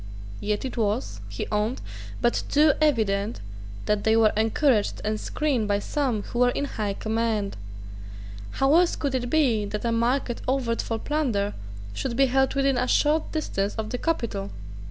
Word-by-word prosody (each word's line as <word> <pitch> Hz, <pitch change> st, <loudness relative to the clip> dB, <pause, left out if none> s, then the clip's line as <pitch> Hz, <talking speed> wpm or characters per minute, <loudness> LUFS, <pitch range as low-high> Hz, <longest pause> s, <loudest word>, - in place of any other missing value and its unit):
Yet 210 Hz, +3 st, -2 dB
it 260 Hz, -, -5 dB
was, 220 Hz, +2 st, -1 dB
he -, -, -4 dB
owned, 215 Hz, +4 st, 0 dB, 0.4 s
but 240 Hz, -1 st, +2 dB
too 300 Hz, 0 st, +5 dB
evident 220 Hz, -7 st, +1 dB, 0.5 s
that 210 Hz, -1 st, +1 dB
they 220 Hz, 0 st, +4 dB
were 220 Hz, -1 st, +4 dB
encouraged 220 Hz, +1 st, +2 dB
and 215 Hz, 0 st, -1 dB
screened 270 Hz, -7 st, -1 dB
by 205 Hz, 0 st, +2 dB
some 240 Hz, -1 st, -1 dB
who 240 Hz, -, -5 dB
were 250 Hz, 0 st, +5 dB
in 280 Hz, -, -1 dB
high 210 Hz, -7 st, -2 dB
command. 220 Hz, -2 st, -1 dB, 1.0 s
How 270 Hz, +2 st, +3 dB
else 345 Hz, +1 st, +4 dB
could 280 Hz, -3 st, -2 dB
it 245 Hz, -2 st, -1 dB
be 255 Hz, -9 st, +3 dB
that 210 Hz, +2 st, -4 dB
a 230 Hz, -, +1 dB
market 240 Hz, +2 st, 0 dB
overt 250 Hz, -3 st, 0 dB
for 225 Hz, -, -3 dB
plunder 230 Hz, -8 st, -1 dB, 0.4 s
should 245 Hz, -, -3 dB
be 270 Hz, +2 st, +5 dB
held 265 Hz, +1 st, +2 dB
within 275 Hz, -2 st, +2 dB
a 250 Hz, -, 0 dB
short 300 Hz, +4 st, +2 dB
distance 205 Hz, -10 st, -2 dB
of 220 Hz, -1 st, -4 dB
the 250 Hz, -, -2 dB
capital? 225 Hz, -11 st, -2 dB
235 Hz, 170 wpm, -25 LUFS, 215-275 Hz, 1.0 s, too